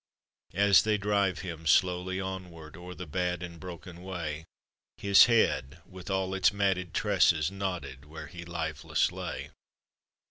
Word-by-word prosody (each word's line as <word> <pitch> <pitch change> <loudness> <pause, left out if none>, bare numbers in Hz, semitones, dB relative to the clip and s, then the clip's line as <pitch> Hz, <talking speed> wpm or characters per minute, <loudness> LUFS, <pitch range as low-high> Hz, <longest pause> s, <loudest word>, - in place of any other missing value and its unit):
As 100 0 +6
they 110 -1 +1
drive 100 -2 +1
him 85 -4 -6
slowly 90 +3 +2
onward, 90 -5 -7
O'er 90 +1 -9
the 90 - -7
bad 90 +1 -2
and 85 -1 -8
broken 90 0 -9
way, 80 -4 -5 0.5
His 100 -1 +7
head, 85 - +1
with 95 0 -11
all 95 -1 -1
its 95 +1 +3
matted 95 -4 -1
tresses, 90 -6 +3
Nodded 90 -9 -5
where 75 +2 -9
he 85 -1 -9
lifeless 85 -2 -1
lay. - - -6
90 Hz, 140 wpm, -29 LUFS, 85-95 Hz, 0.5 s, His